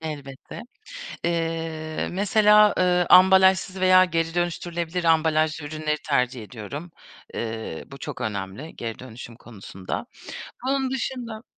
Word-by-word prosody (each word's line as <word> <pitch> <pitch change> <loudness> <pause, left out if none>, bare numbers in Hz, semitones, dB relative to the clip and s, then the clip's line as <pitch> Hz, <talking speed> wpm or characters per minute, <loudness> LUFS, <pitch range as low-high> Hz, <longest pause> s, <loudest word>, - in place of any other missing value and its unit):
Elbette. 145 +2 -8 0.6
Eee, 165 -2 -2
mesela, 210 +2 +5
eee, 180 -1 +3
ambalajsız 190 0 +6
veya 185 0 +6
geri 165 -2 -1
dönüştürülebilir 175 0 -2
ambalajlı 160 -1 +2
ürünleri 155 0 -2
tercih 125 -4 0
ediyorum. 125 - -8 0.4
Eee, 110 -7 -5
bu 135 - -12
çok - - -7
önemli 100 +8 -5
geri 115 -1 -5
dönüşüm 120 -2 -10
konusunda. 100 -5 -7 0.6
Onun 270 -1 0
dışında 240 -3 -4
165 Hz, 110 wpm, -24 LUFS, 135-185 Hz, 0.6 s, ambalajsız